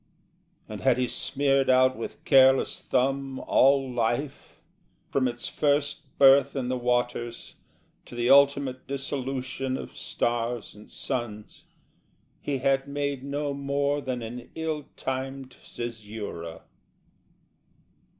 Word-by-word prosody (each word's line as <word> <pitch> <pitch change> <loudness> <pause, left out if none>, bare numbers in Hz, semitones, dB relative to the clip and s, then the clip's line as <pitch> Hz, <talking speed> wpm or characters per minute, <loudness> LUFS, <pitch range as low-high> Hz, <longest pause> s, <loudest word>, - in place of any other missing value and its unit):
And 105 -1 -7
had 130 -2 +3
he 125 0 +1
smeared 135 +1 +1
out 130 0 +5
with 115 - -7
careless 130 0 +5
thumb 135 +1 0
All 135 0 +3
life, 125 +3 -2 0.5
from 130 -2 +2
its 120 0 -4
first 145 0 -1
birth 140 0 +6
in 130 -2 -2
the 130 - 0
waters 120 -1 -1 0.5
To - - -11
the 120 0 0
ultimate 140 -1 +4
dissolution 135 -1 -3
of - - -9
stars 120 -1 -2
and 105 +1 -15
suns, 110 -4 -5 0.8
He 140 -2 -2
had 135 +1 +1
made 140 -2 -3
no 140 +1 -2
more 140 +1 -1
than 125 -3 -4
an 120 +2 -8
ill 160 -2 -3
timed 135 0 -5
caesura. 105 -8 -7
130 Hz, 115 wpm, -27 LUFS, 120-140 Hz, 0.8 s, birth